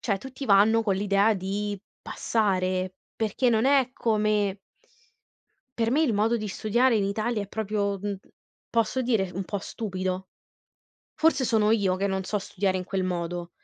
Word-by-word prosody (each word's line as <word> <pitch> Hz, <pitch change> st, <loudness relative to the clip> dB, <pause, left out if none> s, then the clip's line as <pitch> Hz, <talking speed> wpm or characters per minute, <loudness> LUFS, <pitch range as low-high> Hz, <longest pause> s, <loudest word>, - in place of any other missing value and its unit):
cioè, 200 Hz, -4 st, 0 dB
tutti 265 Hz, +3 st, -8 dB
vanno 215 Hz, +2 st, +5 dB
con 200 Hz, -3 st, +1 dB
l'idea 200 Hz, +2 st, +3 dB
di 200 Hz, +1 st, -3 dB, 0.2 s
passare, 185 Hz, -4 st, 0 dB, 0.2 s
perché, 225 Hz, +3 st, +1 dB
non 225 Hz, 0 st, +2 dB
è 270 Hz, -2 st, +4 dB
come 210 Hz, -4 st, +1 dB, 1.2 s
per 225 Hz, 0 st, +1 dB
me, 295 Hz, +6 st, +3 dB
il 270 Hz, -8 st, +2 dB
modo 220 Hz, +3 st, +2 dB
di 215 Hz, -2 st, -4 dB
studiare, 230 Hz, +4 st, +2 dB
in 200 Hz, -, +1 dB
Italia, 215 Hz, +3 st, -1 dB
è 200 Hz, -, -7 dB
proprio, 205 Hz, -2 st, -1 dB
mhmm 205 Hz, +1 st, -3 dB, 0.5 s
posso 230 Hz, +2 st, +1 dB
dire, 220 Hz, -7 st, +1 dB
un 190 Hz, 0 st, -3 dB
po' 205 Hz, -, -3 dB
stupido. 185 Hz, -3 st, -4 dB, 0.9 s
Forse, 315 Hz, -5 st, +2 dB
sono 220 Hz, -2 st, +3 dB
io, 195 Hz, -4 st, +2 dB
che 200 Hz, +1 st, 0 dB
non 190 Hz, 0 st, -2 dB
so 210 Hz, +2 st, -1 dB
studiare 190 Hz, 0 st, -1 dB
in 185 Hz, -, -4 dB
quel 190 Hz, -1 st, -2 dB
modo. 175 Hz, -1 st, -3 dB
205 Hz, 165 wpm, -26 LUFS, 190-225 Hz, 1.2 s, vanno